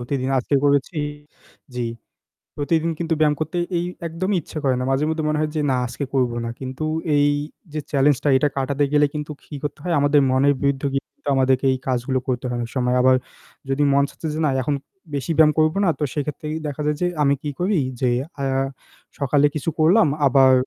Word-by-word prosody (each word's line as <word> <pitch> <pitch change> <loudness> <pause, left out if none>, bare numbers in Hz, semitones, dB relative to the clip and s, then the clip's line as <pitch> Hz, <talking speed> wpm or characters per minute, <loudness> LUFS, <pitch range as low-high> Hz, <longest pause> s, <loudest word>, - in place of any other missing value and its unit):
প্রতিদিন 130 +1 -2
আজকে 135 +3 -1
করেছি 145 +3 +2 0.8
জ্বি। 120 -1 -2 0.7
প্রতিদিন 160 +3 +1
কিন্তু 165 -1 0
ব্যায়াম 150 -1 +3
করতে 155 +3 -3 0.2
এই 170 - -1 0.2
একদমই 185 +4 -1
ইচ্ছা 155 - -7
করে 130 -2 +2
না। - - -1
মাঝে 135 +3 +1
মধ্যে 160 0 -1
মনে 150 0 0
হয় 155 0 -1
যে 155 - +1
না - - +2
আজকে 125 +4 -5
করবো 125 -3 +1
না। - - -3
কিন্তু 130 +3 -4 0.3
এই 145 0 +4 0.4
যে 155 - -2
চ্যালেঞ্জ 140 0 +4
টা 145 - +2
এটা 145 +2 +2
কাটাতে 140 +1 0
গেলে 145 0 +5
কিন্তু 150 0 -4
কি 150 - -9
করতে 150 0 -4
হয় 175 -2 -1
আমাদের 145 0 +4
মনের 135 +2 +4
বিরুদ্ধে 140 0 +1
গিয়ে 135 - 0 0.3
আমাদেরকে 130 0 +2
এই 130 - -2
কাজগুলো 130 +1 0
করতে 125 0 -1
হয় 125 -1 -2
অনেক 115 - -4
সময়। 125 0 +1
আবার 130 0 +5 0.5
যদি 135 +2 +1
মন 140 - +4
চাচ্ছে 160 - -7
যে 155 - -3
না - - +3
এখন 145 +2 0 0.4
বেশি 140 +4 -2
ব্যায়াম 155 -1 +7
করবো 155 +4 +3
না - - +4
তো - - -1
সেক্ষেত্রে 150 0 -4 0.2
দেখা 145 0 -5
যায় 150 0 +1
যে 180 - +3 0.2
আমি 140 0 +4
কি 150 - -3
করি 185 +1 +1 0.2
যে 125 - +3 0.3
আ - - -2 0.8
সকালে 140 +1 +3
কিছু 155 +2 -1
করলাম 160 +3 +5 0.2
আবার 130 0 +5
145 Hz, 205 wpm, -22 LUFS, 130-155 Hz, 0.8 s, ব্যায়াম